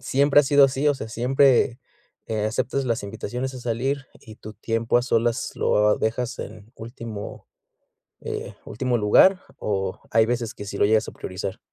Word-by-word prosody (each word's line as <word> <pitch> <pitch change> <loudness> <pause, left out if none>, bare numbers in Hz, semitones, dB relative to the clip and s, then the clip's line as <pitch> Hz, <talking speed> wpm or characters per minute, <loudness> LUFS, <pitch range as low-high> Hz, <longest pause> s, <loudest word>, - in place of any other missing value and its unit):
¿siempre 140 +2 +4
ha - - 0
sido 140 0 +6
así? 135 +2 +1
O 145 - +3
sea, 110 - -7
¿siempre, 125 +1 +3 0.5
eh, 110 -1 -2
aceptas 130 +4 -1
las 115 -1 -1
invitaciones 120 +5 -5
a 130 - -8
salir 130 +4 -2
y 110 - -13
tu 110 - -10
tiempo 115 +2 0
a - - -1
solas 120 +1 0
lo, 105 0 +2
ah, - - +2
dejas 115 +2 -2
en 110 +1 -10
último, 115 -2 -8 0.7
eh, - - -6
último 125 +2 -1
lugar 180 - +5 0.2
o 95 -2 -2
hay 110 0 +4
veces 120 -1 -2
que - - -8
sí 100 - -6
lo - - +4
llegas 110 +1 +2
a - - -7
priorizar? 95 +1 -6
115 Hz, 180 wpm, -24 LUFS, 110-130 Hz, 0.7 s, sido